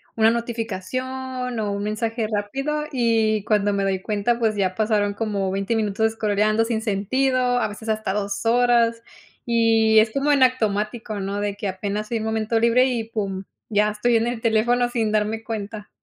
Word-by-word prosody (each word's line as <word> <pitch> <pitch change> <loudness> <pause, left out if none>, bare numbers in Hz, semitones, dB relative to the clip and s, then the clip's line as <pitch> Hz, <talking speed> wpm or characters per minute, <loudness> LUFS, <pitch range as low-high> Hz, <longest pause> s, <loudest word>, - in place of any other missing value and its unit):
una 225 0 +4
notificación 245 +3 -4
o 210 -2 -1
un 200 0 -3
mensaje 220 +2 -2
rápido, 270 +9 -2
y 225 -5 +1
cuando 205 -1 +2
me 200 -1 0
doy 190 -1 0
cuenta, 215 +3 0
pues 220 -2 +1
ya 190 -2 0
pasaron 210 -1 +1
como 205 -3 -2
20 195 +4 -1
minutos 215 0 +1
escroleando 215 0 +1
sin 225 -1 -1
sentido, 245 +5 0 0.2
a - - +1
veces 210 +2 -10
hasta 215 -2 -1
2 200 +1 -3
horas 235 -1 +3 0.4
y 225 -2 +4
es 220 0 +3
como 275 +4 +1
en 275 -2 +4
automático, 220 -3 0
¿no? 200 +1 -3
De 205 -1 -2
que 205 - -4
apenas 205 +3 -4
hay 230 - +1
un 220 - -4
momento 220 +1 0
libre 235 +2 +4
y 240 -3 -2
pum, 200 -4 -4 0.2
ya 210 -1 +2
estoy 230 +3 +2
en 225 +1 0
el 240 -1 -3
teléfono 240 +2 +2
sin 225 -3 -1
darme 215 +1 0
cuenta. 215 -1 -6
220 Hz, 180 wpm, -23 LUFS, 205-235 Hz, 0.4 s, una